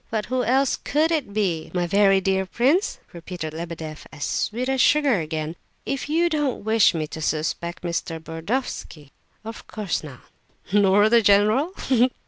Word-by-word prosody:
"But 220 -1 -2
who 255 0 -1
else 265 +2 +2
could 310 +3 0
it 300 -10 -1
be, 190 -6 -1
my 175 -1 +1
very 195 +2 +4
dear 190 0 0
prince?" 275 - +1 0.2
repeated 170 -2 -6
Lebedeff, 160 -2 -7
as 150 -2 -7
sweet 245 +4 -2
as 265 -1 +1
sugar 290 -8 +4
again. 155 0 -4 0.3
"If 275 +1 -3
you 335 +3 +2
don't 295 -8 -1
wish 220 -3 +4
me 155 -2 -1
to 160 +1 -8
suspect 160 +3 -2
Mr. 170 -1 -3
Burdovsky?" 165 - -5 0.3
"Of 225 +1 -8
course 210 -7 -3
not." 140 -5 -10 0.5
"Nor 205 0 +5
the 235 +1 +5
general? 215 - +3
Ha, - - -9
ha, 260 - +2
ha!" 245 +2 +5
200 Hz, 170 wpm, -23 LUFS, 165-255 Hz, 0.5 s, Nor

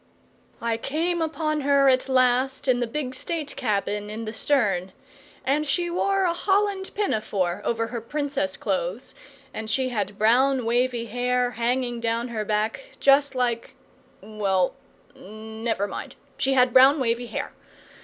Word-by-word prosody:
I 230 -1 0
came 330 +8 -1
upon 305 -1 -1
her 280 0 +4
at 260 0 +3
last 260 +1 +2
in 250 -2 +3
the 240 - -1
big 255 +1 -4
state 305 +2 -4
cabin 210 -3 -1
in 220 +2 -5
the 215 - -5
stern; 200 -9 0 0.5
and 285 +3 +2
she 345 +4 -1
wore 390 +2 +1
a 350 -2 +2
holland 390 +1 0
pinafore 215 - -1
over 230 -1 0
her 235 0 -5
Princess 285 +2 -2
clothes, - - -3 0.4
and 220 0 -5
she 260 +3 0
had 205 -4 -3
brown 250 +4 +3
wavy 240 0 +1
hair, 245 +2 0
hanging 240 +1 -1
down 230 +1 -1
her 220 -2 -3
back, 215 - -2
just 275 0 +4
like 240 -2 -1 0.5
well, 195 -3 0 0.4
never 220 +1 -4
mind, - - -7 0.2
she 270 - +2
had 250 -2 +4
brown 270 +3 +7
wavy 240 -1 0
hair. 225 - -4
250 Hz, 145 wpm, -25 LUFS, 225-285 Hz, 0.5 s, brown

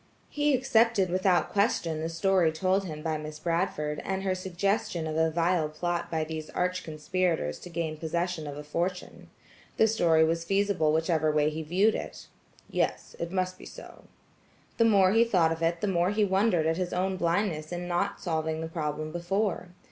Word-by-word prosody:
He 295 -1 +2
accepted 230 -7 +2
without 185 -1 +2
question 175 -6 +1
the 160 - -2
story 170 0 +2
told 185 +4 0
him 155 -3 -7
by 160 -2 -1
Miss 155 0 -7
Bradford 155 -2 -1
and 195 0 -2
her 190 -1 +1
suggestion 190 0 -1
of 155 -1 -3
a 160 0 +3
vile 165 -1 +1
plot 175 +3 -3
by 160 -1 -1
these 155 0 -6
arch 180 0 -1
conspirators 160 - -1
to - - -10
gain 165 -2 -3
possession 170 0 -2
of 145 0 -6
a 150 - -6
fortune. 175 +5 -4 0.5
The 220 - +5
story 170 -7 +3
was 165 +1 +1
feasible 195 -4 +1
whichever 160 -1 +1
way 150 0 +2
he 155 +1 -4
viewed 185 +8 +2
it. - - -6 0.4
"Yes, - - -2
it 170 0 -4
must 185 -1 -2
be - - -11
so." - - -12 0.7
The 230 - +5
more 195 -4 +5
the 225 +1 +6
thought 180 -8 +2
of 165 0 -3
it, 165 +1 0
the 210 - 0
more 175 -2 +2
he 210 +1 +2
wondered 190 -3 +2
at 160 +1 +1
his 180 -1 -2
own 185 +1 0
blindness 170 -3 -1
in 175 0 -4
not 180 +3 -1
solving 160 -2 -2
the 160 - -3
problem 155 -1 -3
before. 180 +3 -1
175 Hz, 185 wpm, -28 LUFS, 160-190 Hz, 0.7 s, the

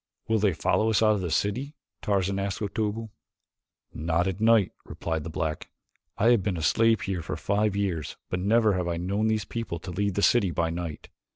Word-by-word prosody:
"Will 110 0 +2
they 100 -3 +2
follow 110 +7 +1
us 110 0 +3
out 110 -1 +5
of 105 - -1
the 90 - -2
city?" 115 - -1 0.3
Tarzan 100 -1 0
asked 100 0 -2
Otobu. 110 +2 -2 0.8
"Not 80 +2 0
at 95 +2 -3
night," 110 -3 +4
replied 80 -2 -4
the 80 - -5
black. 80 -1 -3 0.5
"I 115 - +4
have 120 -4 +4
been 90 -1 -1
a 80 - -4
slave 115 +7 +3
here 95 -3 -2
for - - -4
five 105 0 0
years 90 -7 -2
but 90 - -2
never 110 +2 +3
have 90 -2 -1
I 85 -1 -1
known 100 +5 0
these 110 -3 0
people 115 -5 -4
to 90 +2 -8
leave 100 +1 -1
the 100 - 0
city 115 -6 +4
by 85 -1 -1
night. 85 -2 -6
100 Hz, 205 wpm, -27 LUFS, 85-110 Hz, 0.8 s, out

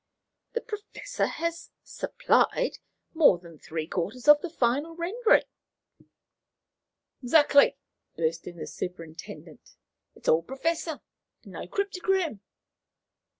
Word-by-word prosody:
"The 470 - -1
Professor 440 +2 -4
has 335 0 -4
'supplied' - - +1 0.3
more 315 - +6
than 170 -3 -15
three 160 -1 -4
quarters 195 - -4
of 295 0 +8
the 355 - -4
final 290 +3 0
rendering." 415 +8 +3 1.8
"Exactly," 285 +2 +5 0.4
burst 165 0 -1
in 175 - -8
the - - -5
superintendent; 165 -3 -8 0.4
"it's - - -13
all 160 - +5
Professor 315 - -2 0.4
and - - -13
no - - -7
cryptogram." 380 - -1
295 Hz, 105 wpm, -27 LUFS, -, 1.8 s, of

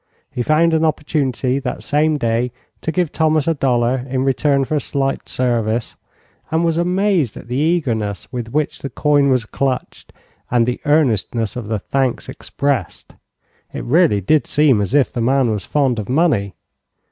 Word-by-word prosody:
He 125 - -3
found 160 +5 +3
an 160 0 +2
opportunity 140 -4 0
that 130 -2 -5
same 150 +1 +1
day 120 -1 0 0.3
to 160 - -2
give 175 -3 0
Thomas 155 -2 +1
a 165 - +3
dollar 125 -3 +1
in 130 0 0
return 135 +1 +1
for 155 - -4
a 150 - +2
slight 135 -1 -2
service, 115 -2 -1 0.5
and 165 +2 +1
was 165 0 +1
amazed 180 - +1
at - - -11
the 125 - -4
eagerness 125 - -1
with 120 -2 -5
which 150 +2 -1
the 140 - -5
coin 145 +1 +2
was 125 -4 +2
clutched 130 +3 -3 0.4
and 120 -1 +3
the 125 +1 -3
earnestness 120 -7 +1
of 120 -4 -5
the 110 0 -1
thanks 130 +4 -1
expressed. 135 - -3 0.6
It - - -5
really 125 - +3
did 150 - +2
seem 145 -8 +3
as 100 +7 -1
if 140 -3 +3
the 120 - -2
man 130 0 +2
was 105 -4 -3
fond 135 -6 +1
of 105 - -6
money. 130 - +1
135 Hz, 170 wpm, -19 LUFS, 120-155 Hz, 0.6 s, found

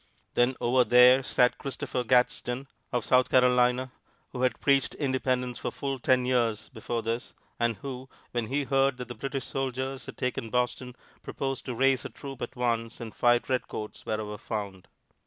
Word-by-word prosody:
Then 125 +2 +3
over 125 +1 +3
there 125 +3 +7
sat 125 -1 +2
Christopher 130 -2 -3
Gadsden, 125 +2 +1 0.2
of 120 -3 -1
South 125 0 +4
Carolina, 125 0 +3 0.4
who 125 - -5
had 130 -1 +1
preached 140 -1 +2
independence 130 -3 -1
for - - -2
full 135 -1 -4
ten 125 0 +3
years 120 -4 0
before 115 -1 -4
this, 115 +2 -3 0.2
and 120 -1 +1
who, 130 +1 -7 0.2
when 120 -2 -2
he 140 +4 0
heard 135 -1 +2
that 125 -1 -7
the - - -4
British 135 +3 -4
soldiers 135 0 -3
had - - -9
taken 125 -3 -2
Boston, 125 +1 -1 0.3
proposed 135 -1 -4
to 125 - -4
raise 135 +1 +3
a - - -5
troop 135 -3 -9
at - - -5
once 115 -2 -1
and 115 -2 -7
fight 120 0 +3
redcoats 125 -4 -3
wherever 105 -1 -4
found. 100 -4 -5
125 Hz, 170 wpm, -28 LUFS, 120-130 Hz, 0.4 s, there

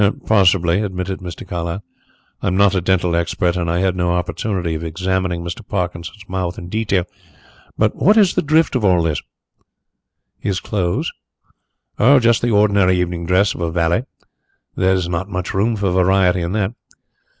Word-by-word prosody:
"Possibly," 95 -3 +3
admitted 95 -2 -3
Mr. 90 -2 -8
Carlyle. 85 +3 -4 0.6
"I - - -2
am 90 - 0
not 100 -1 +4
a 95 - +1
dental 90 -1 +1
expert 85 +1 0
and 85 -2 -1
I 85 +2 0
had 95 -1 +1
no 90 -1 0
opportunity 90 0 -2
of 80 +1 -4
examining 90 +1 -2
Mr. 85 0 -6
Parkinson's 90 +1 -5
mouth 95 -1 -3
in 85 - -8
detail. 100 -3 0 0.7
But 110 -1 +1
what 210 +3 +4
is 200 -5 +5
the - - +1
drift 155 0 +2
of 125 - 0
all 90 -4 +3
this?" 80 -2 -1 1.2
"His 100 -2 -2
clothes?" 90 -4 -2 0.9
"Oh, 135 +6 +6
just 115 -1 +3
the 120 - +1
ordinary 100 -4 +3
evening 85 -1 -2
dress 95 +3 +3
of - - -9
a 85 - 0
valet. 85 +7 0 0.7
There 95 +1 +2
is 90 -2 -1
not 90 +3 -3
much 90 -2 -4
room 110 +4 +1
for 100 -3 -1
variety 90 0 +3
in 85 +2 -3
that." 105 0 -1
95 Hz, 170 wpm, -19 LUFS, 85-100 Hz, 1.2 s, Oh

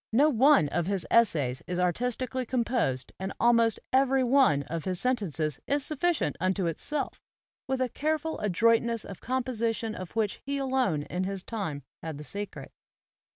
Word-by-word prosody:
No 285 +7 +4
one 270 - +5
of 175 +2 -1
his 195 -3 -1
essays 150 - +3
is 180 - -2
artistically 250 +8 -1
composed 230 - -1
and 190 +1 -3
almost 230 -2 +4
every 265 0 +4
one 250 - +4
of 160 +3 -5
his 185 -2 -1
sentences 165 - -1
is 285 0 +1
sufficient 325 +3 0
unto 185 +1 0
it 165 -2 -2
self, 300 -1 -3 0.5
with 265 0 -1
a 255 - +2
careful 310 +5 -2
adroitness 230 +3 +2
of 195 - -9
composition 235 -3 -1
of 185 -2 -8
which 215 -3 -1
he 280 +1 -2
alone 255 - 0
in 180 +4 -3
his 195 -1 -4
time 180 - -4 0.2
had 160 -3 -5
the 150 - -8
secret. 205 +6 -6
225 Hz, 160 wpm, -28 LUFS, 180-260 Hz, 0.5 s, one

